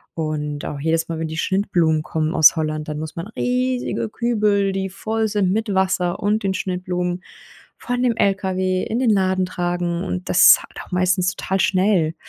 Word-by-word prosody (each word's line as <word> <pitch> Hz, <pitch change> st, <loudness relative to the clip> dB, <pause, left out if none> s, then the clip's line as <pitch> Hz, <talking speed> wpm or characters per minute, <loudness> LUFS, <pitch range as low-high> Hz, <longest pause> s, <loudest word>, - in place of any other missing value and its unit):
Und 150 Hz, -2 st, -3 dB
auch 145 Hz, -, -5 dB
jedes 165 Hz, +1 st, 0 dB
Mal, 165 Hz, -, -4 dB
wenn 160 Hz, -, -2 dB
die 160 Hz, -, -6 dB
Schnittblumen 170 Hz, -5 st, +1 dB
kommen 155 Hz, +1 st, -2 dB
aus 160 Hz, -, +7 dB
Holland, 155 Hz, -1 st, -2 dB
dann 150 Hz, 0 st, -4 dB
muss 155 Hz, 0 st, -6 dB
man 170 Hz, +3 st, -5 dB
riesige 250 Hz, 0 st, -2 dB
Kübel, 210 Hz, -4 st, +1 dB
die 190 Hz, 0 st, -2 dB
voll 220 Hz, +3 st, -2 dB
sind 200 Hz, -3 st, +1 dB
mit 215 Hz, 0 st, -1 dB
Wasser 190 Hz, -2 st, 0 dB
und 210 Hz, +1 st, 0 dB
den 190 Hz, -1 st, 0 dB
Schnittblumen 180 Hz, -1 st, -3 dB, 0.5 s
von 245 Hz, 0 st, -3 dB
dem 245 Hz, -3 st, +2 dB
LKW 185 Hz, -2 st, 0 dB
in 230 Hz, +3 st, -2 dB
den 250 Hz, -3 st, +2 dB
Laden 190 Hz, -2 st, +2 dB
tragen 175 Hz, -1 st, -2 dB
und 180 Hz, -1 st, -4 dB
das -, -, +8 dB
halt -, -, -12 dB
auch -, -, -21 dB
meistens 185 Hz, 0 st, +1 dB
total 190 Hz, 0 st, -2 dB
schnell. 185 Hz, -5 st, +2 dB
185 Hz, 180 wpm, -21 LUFS, 165-200 Hz, 0.5 s, das